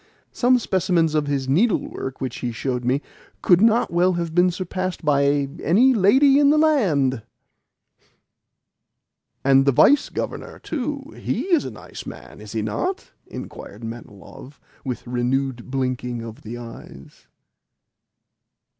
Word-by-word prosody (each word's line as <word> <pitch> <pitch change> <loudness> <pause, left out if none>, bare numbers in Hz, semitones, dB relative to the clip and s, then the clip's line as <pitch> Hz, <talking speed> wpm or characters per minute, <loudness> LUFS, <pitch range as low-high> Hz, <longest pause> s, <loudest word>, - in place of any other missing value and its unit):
Some 250 +1 +3
specimens 180 -7 +1
of 150 -2 0
his 140 -2 -1
needlework 150 - 0
which 130 -3 -4
he 120 - -3
showed 125 +1 -3
me 130 +4 0 0.4
could 175 0 +5
not 225 -3 +3
well 180 +2 +3
have 170 -2 -3
been 180 +1 +4
surpassed 185 -1 -4
by 140 -1 +2
any 245 +10 +4
lady 265 +7 +5
in 285 -1 +5
the 300 - +4
land!" 175 - +2 2.2
"And 135 0 +5
the - - +6
Vice 280 - +4
Governor, - - -5
too 285 +1 -5
he 235 - -2
is 320 - +3
a - - -4
nice - - -11
man, - - -11
is - - -10
he - - -2
not?" 375 +1 -3 0.2
inquired - - -9
Manilov 115 +4 -10 0.2
with 125 -3 -5
renewed 125 +1 -2
blinkings 125 -2 -2
of 115 -1 -10
the 115 +2 -7
eyes. 115 - -12
150 Hz, 135 wpm, -22 LUFS, -, 2.2 s, the